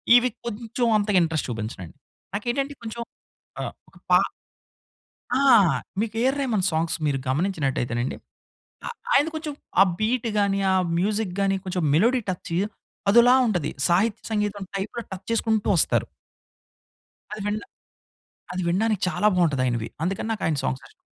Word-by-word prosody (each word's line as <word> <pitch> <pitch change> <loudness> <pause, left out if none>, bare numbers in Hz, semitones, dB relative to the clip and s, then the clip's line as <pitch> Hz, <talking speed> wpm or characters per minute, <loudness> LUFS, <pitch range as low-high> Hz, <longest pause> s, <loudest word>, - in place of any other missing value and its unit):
ఇవి 245 +1 +5 0.2
కొంచెం 235 +1 -2
అంతగా 205 -2 +1
ఇంట్రెస్ట్ 160 -2 -1
చూపించనండి. 110 -7 -6 0.4
నాకేంటంటే 270 +7 -1
కొంచెం 230 +1 -5 0.6
ఆహ్, - - -4 0.2
ఒక - - -19
పా - - +8 1.2
ఆ! - - +3 0.6
మీకు 225 -1 -3
ఏఆర్ 265 +3 +2
రెహమాన్ 220 -8 0
సాంగ్స్ 160 +1 0
మీరు 140 -2 +1
గమనించినట్టయితేనండి. 130 -6 -1 0.7
ఆహ్, 480 - -5 0.2
ఆయన 295 - +5
కొంచెం 310 -2 -4 0.3
ఆ - - +9 0.2
బీట్‌ 230 +2 +1
గాని, 200 -1 +2
ఆ - - +3 0.2
మ్యూజిక్‌ 205 -1 0
గాని 195 0 +2
కొంచెం 185 -2 -2
మెలోడీ 240 +10 +4
టచ్ 180 -2 -4 0.6
అదోలా 240 +3 +7
ఉంటది. 175 -8 0 0.2
సాహిత్య 200 +5 +2
సంగీతం 210 -1 -1
టైప్‌లో 215 +4 -4
టచ్ 190 - -8
చేసుకుంటూ 220 -2 +1
ఒస్తారు. - - +2 1.3
అది 210 - -6
వినడ 210 +2 -1 0.9
అది 185 - -2
వినడానికి 210 +3 +1
చాలా 210 - +1
బాగుంటది 155 -8 +2
ఆయనవి. 120 -2 -1 0.2
అందుకని 190 +5 -2
నాకు 215 - -3
ఆయన 155 -3 +1
సాంగ్స్ 130 -1 -2
ఇష్టం. - - -26
200 Hz, 140 wpm, -24 LUFS, 165-230 Hz, 1.3 s, ఆ